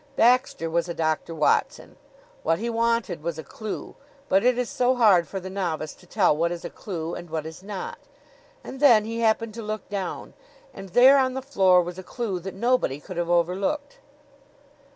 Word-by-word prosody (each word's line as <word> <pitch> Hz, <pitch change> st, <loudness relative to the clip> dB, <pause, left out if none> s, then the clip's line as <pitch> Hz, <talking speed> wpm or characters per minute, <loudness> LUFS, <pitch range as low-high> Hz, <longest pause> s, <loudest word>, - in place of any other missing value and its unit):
Baxter 245 Hz, -7 st, +3 dB
was 170 Hz, +1 st, -1 dB
a 170 Hz, -, -4 dB
Doctor 160 Hz, +1 st, -1 dB
Watson. 155 Hz, -, 0 dB, 0.5 s
What 165 Hz, +1 st, +1 dB
he 235 Hz, +4 st, -3 dB
wanted 230 Hz, -7 st, 0 dB
was 165 Hz, 0 st, -4 dB
a 160 Hz, -, -6 dB
clew; 215 Hz, +9 st, -7 dB, 0.3 s
but 190 Hz, +1 st, +3 dB
it 250 Hz, 0 st, +3 dB
is 250 Hz, -1 st, -1 dB
so 250 Hz, +2 st, +1 dB
hard 200 Hz, -9 st, +5 dB
for 195 Hz, -, -5 dB
the 185 Hz, -, -8 dB
novice 170 Hz, -5 st, -3 dB
to 180 Hz, -, -20 dB
tell 180 Hz, -5 st, +3 dB
what 170 Hz, +2 st, 0 dB
is 175 Hz, -1 st, -6 dB
a -, -, -6 dB
clew 170 Hz, -4 st, -5 dB
and 175 Hz, -, -7 dB
what 155 Hz, -1 st, -3 dB
is 160 Hz, +2 st, -9 dB
not. 465 Hz, -, -6 dB, 0.6 s
And 265 Hz, -, -8 dB
then 235 Hz, -7 st, +6 dB
he 230 Hz, +1 st, -4 dB
happened 225 Hz, -1 st, +1 dB
to 230 Hz, -, -7 dB
look 215 Hz, 0 st, -5 dB
down 195 Hz, -3 st, -5 dB, 0.4 s
and 195 Hz, -, -9 dB
there 260 Hz, +8 st, +7 dB
on 260 Hz, -1 st, +1 dB
the 265 Hz, -, -3 dB
floor 190 Hz, -9 st, +4 dB
was 175 Hz, +1 st, -7 dB
a -, -, -8 dB
clew 205 Hz, -2 st, -4 dB
that 190 Hz, +2 st, -7 dB
nobody 235 Hz, -, +1 dB
could 180 Hz, +4 st, -9 dB
have 175 Hz, 0 st, -1 dB
overlooked. 190 Hz, -, 0 dB
195 Hz, 195 wpm, -25 LUFS, 170-235 Hz, 0.6 s, there